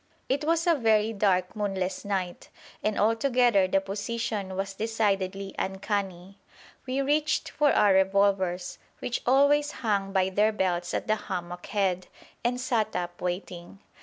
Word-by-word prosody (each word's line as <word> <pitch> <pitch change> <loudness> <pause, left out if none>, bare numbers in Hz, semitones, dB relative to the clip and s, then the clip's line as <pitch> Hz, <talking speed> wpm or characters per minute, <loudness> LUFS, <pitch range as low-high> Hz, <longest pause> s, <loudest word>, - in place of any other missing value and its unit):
It 275 +3 0
was 330 +1 +1
a 345 - +5
very 220 -5 +2
dark 190 -2 +1
moonless 190 -3 -2
night, 190 -3 -3 0.3
and 215 -1 -1
altogether 230 -2 +3
the 195 +1 +2
position 200 0 -4
was 195 +1 -3
decidedly 195 -3 -1
uncanny. 195 -1 -3 0.5
We 260 +2 0
reached 300 +2 0
for 295 -2 +3
our 205 -2 +4
revolvers, 190 -2 +1 0.2
which 240 - -3
always 285 +3 +4 0.2
hung 200 -2 0
by 190 -1 +2
their 210 +3 +3
belts 180 -3 -1
at - - -2
the 215 0 +1
hammock 175 -3 -6
head, 190 -5 0 0.4
and 245 +1 0
sat 235 -4 0
up 175 0 -4
waiting. 180 0 -5
200 Hz, 140 wpm, -27 LUFS, 190-230 Hz, 0.5 s, a